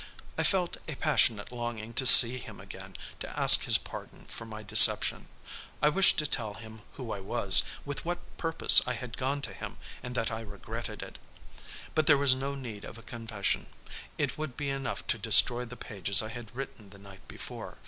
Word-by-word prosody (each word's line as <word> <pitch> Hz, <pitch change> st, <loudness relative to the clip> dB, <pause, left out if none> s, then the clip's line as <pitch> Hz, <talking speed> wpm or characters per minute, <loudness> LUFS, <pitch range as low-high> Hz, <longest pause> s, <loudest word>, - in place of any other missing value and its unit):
I -, -, -3 dB
felt 180 Hz, -3 st, -1 dB
a 155 Hz, -, -7 dB
passionate 125 Hz, -8 st, -1 dB
longing 120 Hz, -2 st, -8 dB
to 130 Hz, -, +1 dB
see 125 Hz, 0 st, +9 dB
him -, -, -12 dB
again, -, -, -13 dB, 0.2 s
to -, -, -8 dB
ask -, -, +6 dB
his -, -, +4 dB
pardon -, -, -13 dB
for 115 Hz, -, -10 dB
my 110 Hz, -1 st, -11 dB
deception. 110 Hz, +2 st, +5 dB, 0.5 s
I 150 Hz, -, +1 dB
wished 190 Hz, +5 st, +3 dB
to 150 Hz, -, -2 dB
tell 110 Hz, -7 st, -4 dB
him 110 Hz, 0 st, -14 dB
who 125 Hz, -4 st, -10 dB
I 100 Hz, -, -6 dB
was, 100 Hz, 0 st, +2 dB, 0.2 s
with 145 Hz, -1 st, -7 dB
what 175 Hz, +1 st, -5 dB, 0.2 s
purpose 165 Hz, -1 st, +5 dB
I 125 Hz, -, -3 dB
had 125 Hz, 0 st, -9 dB
gone 140 Hz, +2 st, -5 dB
to -, -, -6 dB
him -, -, -11 dB, 0.2 s
and 125 Hz, 0 st, -10 dB
that 115 Hz, -1 st, -3 dB
I 110 Hz, 0 st, -7 dB
regretted 100 Hz, -3 st, -10 dB
it. -, -, -14 dB, 0.7 s
But 155 Hz, -2 st, -2 dB
there 145 Hz, -, +4 dB
was 140 Hz, -2 st, +3 dB
no 135 Hz, +2 st, -6 dB
need 120 Hz, -7 st, -10 dB
of -, -, -12 dB
a 115 Hz, -, -15 dB
confession. 115 Hz, -4 st, -5 dB, 0.5 s
It -, -, -4 dB
would 155 Hz, -5 st, -8 dB
be 145 Hz, -2 st, -5 dB
enough 135 Hz, -2 st, -7 dB
to -, -, -3 dB
destroy 125 Hz, 0 st, +4 dB
the 125 Hz, +1 st, -13 dB
pages 100 Hz, 0 st, +1 dB
I 110 Hz, -, -8 dB
had 120 Hz, 0 st, -12 dB
written 125 Hz, -6 st, -10 dB
the 100 Hz, -, -17 dB
night 100 Hz, -1 st, -17 dB
before. -, -, -10 dB
120 Hz, 200 wpm, -27 LUFS, 110-140 Hz, 0.7 s, see